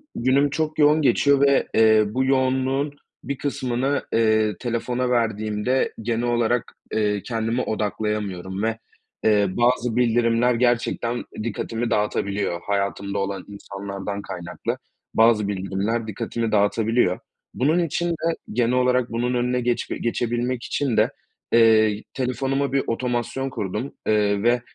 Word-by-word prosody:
günüm 135 +4 +2
çok 155 +2 -2
yoğun 150 +1 +5
geçiyor 140 +1 +3
ve, 140 -1 +4
eee, 110 -1 +5
bu 130 +6 -1
yoğunluğun 130 +2 +1 0.3
bir 140 +2 -4
kısmını, 135 -1 -1
eee, 110 -3 +2
telefona 125 +1 -1
verdiğimde 110 +1 0
genel 115 +1 -1
olarak, 120 0 0 0.2
eee, 105 -2 +1
kendimi 115 +1 -1
odaklayamıyorum 105 -4 -3
ve, 115 0 -1 0.5
eee, 105 -2 +4
bazı 120 +2 +1
bildirimler 120 0 +3
gerçekten 120 0 0 0.2
dikkatimi 115 +1 -3
dağıtabiliyor. 100 -4 -1
Hayatımda 100 0 -2
olan 100 -1 -3
insanlardan 100 0 -6
kaynaklı 90 -2 -5 0.4
bazı 110 -2 +4
bildirimler 100 +3 -2
dikkatimi 115 +1 -3
dağıtabiliyor. 105 -1 +2 0.3
Bunun 155 +7 +2
için 175 +1 -1
de 165 0 -1 0.2
genel 120 +1 +1
olarak 125 -1 +2
bunun 120 +2 -1
önüne 125 0 0
geçbe 120 0 -1
geçebilmek 120 +1 -1
için 135 -6 -1
de, - - +3 0.4
eee, 110 -2 +5
telefonuma 135 +1 -1
bir 135 - +2
otomasyon 125 +2 -2
kurdum, 105 +4 -4
eee, 105 -1 +2
ve 120 +1 +3
115 Hz, 125 wpm, -23 LUFS, 105-125 Hz, 0.5 s, yoğun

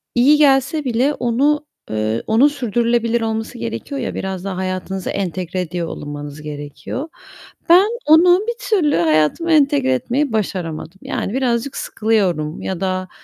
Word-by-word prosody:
iyi 280 +5 +5
gelse 280 +1 +3
bile 255 +4 +1
onu, 285 +6 +1 0.3
eee, 110 +1 -1
onun 230 +6 +5
sürdürülebilir 235 -3 0
olması 220 0 -3
gerekiyor 115 - -5
ya, - - -4
biraz 190 -1 -4
daha 190 -2 -4
hayatınıza 185 0 -3
entegre 185 -1 -3
ediyor 170 -1 -3
olunmanız 145 0 -7
gerekiyor. 150 - -6 0.6
Ben, 365 +4 +7 0.2
onu 350 +4 +6
bir 470 - 0 0.2
türlü 335 -9 +3
hayatıma 160 - +2
entegre 285 - +3
etmeyi 255 - -1
başaramadım. 185 -4 -3
Yani, 200 - -3
birazcık 255 0 -1
sıkılıyorum 185 -8 -1
ya 190 -2 -4
da, 185 -1 -2
220 Hz, 135 wpm, -19 LUFS, 175-275 Hz, 0.6 s, Ben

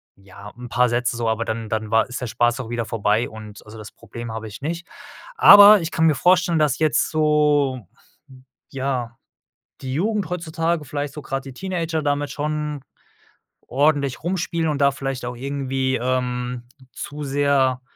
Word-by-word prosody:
ja, 100 +1 -13
'n 125 - -8
paar 125 0 +2
Sätze 120 +1 0
so, 115 -1 -1
aber 110 +1 -1
dann 110 -1 -4
dann 110 -1 -3
war 115 +1 +3
ist 125 - -5
der 125 - -3
Spaß 120 +2 +1
auch 115 - -8
wieder 120 -1 -2
vorbei 110 +1 0
und 110 -2 -11
also, 105 +1 -12
das 110 -1 -10
Problem 115 +1 -9
habe 110 0 -6
ich 105 +5 -11
nicht. 170 +4 -4 0.5
Aber 205 - +9
ich 165 +1 -4
kann 160 - +1
mir 155 - +3
vorstellen, 175 0 +3
dass 145 -3 +1
jetzt 155 -1 +2
so 150 - +1 0.8
ja, 130 -4 -3 0.7
die 130 0 -4
Jugend 205 +2 -1
heutzutage, 165 -2 -2
vielleicht 145 +1 -5
so 150 - -8
grade 135 0 -4
die - - -14
Teenager 170 -2 -3
damit 145 -1 -1
schon 150 0 -3 0.9
ordentlich 140 0 +1
rumspielen 170 -2 -1
und 145 - -2
da 140 0 +4
vielleicht 135 -2 -5
auch 125 0 -5
irgendwie, 135 0 -2
ähm, 125 0 -2 0.3
zu 150 0 -7
sehr 135 -2 +1
135 Hz, 170 wpm, -22 LUFS, 120-155 Hz, 0.9 s, Aber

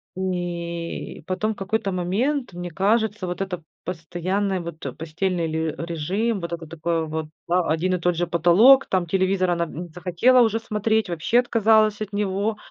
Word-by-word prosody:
И 170 -3 -4
потом, 210 +5 -1
в - - -16
какой-то 195 0 -1
момент, 210 +8 -1
мне 175 0 -5
кажется, 205 +3 +1
вот 180 +2 -4
это 180 -4 -4 0.2
постоянная, 185 +3 -2
вот, 170 -2 -7 0.2
постельный 170 +2 -1
ле 160 -1 -2
режим, 180 +7 -1
вот 170 0 -4
это 165 -2 -6
такое 165 0 -1
вот 160 0 -3 0.2
ва 175 -2 +1
один 180 +3 +1
и - - -3
тот 175 0 +1
же 175 +1 -1
потолок, 180 - +6
там, 185 -2 +1
телевизор 185 +1 +1
она, 170 -1 +1
м, 160 +1 -7
не 175 - -9
захотела 180 +9 +3
уже 225 -1 +2
смотреть, 220 -1 0
вообще 170 +8 +2
отказалась 220 -3 +3
от 210 -1 -5
него, 205 +1 -1
185 Hz, 170 wpm, -23 LUFS, 170-210 Hz, 0.2 s, потолок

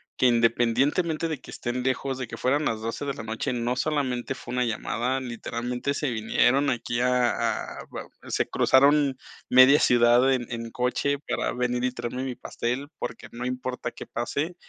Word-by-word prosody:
que 130 - +3
independientemente 125 +8 +2
de 155 -5 -4
que - - -11
estén 125 +1 -3
lejos, 130 0 -1
de 130 -3 -4
que - - -7
fueran 145 +4 +1
las 110 -1 0
12 115 +4 -4
de 140 - -2
la - - -7
noche, 110 +4 -3
no 120 +1 -1
solamente 130 -3 -1
fue - - -8
una 125 0 +1
llamada, 120 +3 -1
literalmente 125 +2 -3
se 145 -2 -1
vinieron 125 +5 +2
aquí 120 0 -1
a 125 -2 +3 0.5
a - - -11
va - - -6 0.2
se - - 0
cruzaron 140 0 +4 0.3
media 130 +3 +7
ciudad 120 +2 +5
en 125 -2 0
en 115 -1 -5
coche 125 +3 0
para - - -1
venir 125 0 -1
y 125 - +1
traerme 120 +1 -4
mi 130 -2 -4
pastel, 125 +4 -3
porque 115 - -5
no 125 +1 -5
importa 125 0 -3
qué - - -9
pase, 145 +8 -3
125 Hz, 180 wpm, -26 LUFS, 120-135 Hz, 0.5 s, media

